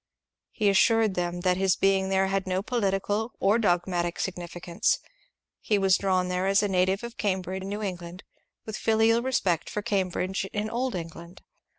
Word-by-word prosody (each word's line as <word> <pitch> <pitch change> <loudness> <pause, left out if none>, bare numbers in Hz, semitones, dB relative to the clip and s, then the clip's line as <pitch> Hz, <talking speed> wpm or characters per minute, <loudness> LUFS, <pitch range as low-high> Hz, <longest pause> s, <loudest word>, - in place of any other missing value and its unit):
He 215 - -1
assured 215 +1 +4
them 175 -1 -2
that 180 0 +2
his 190 -1 +2
being 195 -1 +2
there 190 0 +2
had 195 0 -1
no 185 +1 -1
political 210 0 -1
or 205 +4 +3
dogmatical 175 -3 0
signifi 175 -2 -4
cance. 170 0 +1 0.6
He 210 - +1
was 195 -2 +3
drawn 185 -2 +1
there 180 +1 -1
as 195 +1 +3
a - - +2
native 190 +2 +1
of 235 0 -7
Cambridge 190 -2 -2
in 190 - -6
New 205 +1 -4
England, 180 -1 -6 0.4
with 220 -1 -5
filial 225 +1 +3
respect 195 -10 0
for 210 - -4
Cambridge 190 -3 -1
in 215 +1 -2
Old 250 0 -1
England. 170 +1 -8
190 Hz, 175 wpm, -27 LUFS, 180-210 Hz, 0.6 s, assured